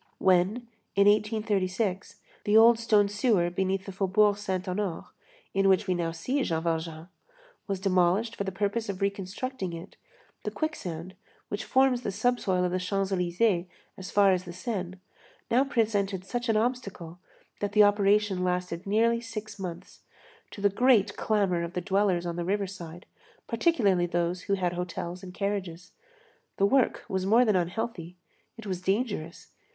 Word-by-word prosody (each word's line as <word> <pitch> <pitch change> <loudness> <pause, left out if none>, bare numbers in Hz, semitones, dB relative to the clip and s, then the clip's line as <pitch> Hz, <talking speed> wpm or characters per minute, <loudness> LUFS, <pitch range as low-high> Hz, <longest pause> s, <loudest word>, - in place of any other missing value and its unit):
When, 190 +6 +2 0.3
in 200 0 +5
1836, 205 -2 0 0.2
the 210 +1 +4
old 230 +1 +7
stone 215 -3 +3
sewer 205 -4 +1
beneath 190 +1 -1
the 195 - -6
Faubourg 200 +2 +3
Saint 190 -3 -3
Honoré, 185 -2 -3 0.5
in 195 0 +3
which 190 +2 +3
we 185 - +1
now 170 -2 -1
see 250 +13 -2
Jean 165 -9 -1
Valjean, 165 -1 -3 0.6
was 195 -2 -2
demolished 190 +4 +2
for - - -3
the 190 - -3
purpose 205 +3 -2
of 190 -2 -4
reconstructing 200 +1 -3
it, 165 +1 -9 0.5
the - - -2
quicksand, 185 - -4 0.4
which - - -3
forms 260 -2 +3
the 205 - -3
subsoil 205 -4 +1
of 180 - -1
the 185 - 0
Champs 195 +1 -1
Élysées 180 0 +1 0.3
as 190 0 -8
far 200 -1 +4
as 185 -1 0
the 175 - -8
Seine, 185 -2 -4 0.7
presented 200 -6 0
such 240 +4 -3
an 220 - +3
obstacle, 200 -8 -3 0.4
that 205 0 -2
the 210 0 +7
operation 205 -2 +3
lasted 180 0 -2
nearly 230 +3 +2
six 215 -3 -7
months, 180 -1 -7 0.5
to 200 - -10
the 205 - +4
great 230 0 +3
clamor 200 -5 +1
of 170 +1 -5
the - - -1
dwellers 195 -3 +1
on 170 0 -3
the 175 - -2
riverside, 185 -3 -4 0.4
particularly 220 - +2
those 175 +1 -1
who 200 - +1
had 180 -2 -1
hotels 175 0 -5
and 185 -1 -10
carriages. 190 -3 -3 0.7
The 195 - +3
work 260 +4 +2
was 190 -1 -2
more 235 +4 +5
than 215 -3 +2
unhealthy; 180 -1 -3 0.4
it 225 - -10
was 185 -3 -3
dangerous. 195 -4 -2
195 Hz, 160 wpm, -28 LUFS, 180-215 Hz, 0.7 s, old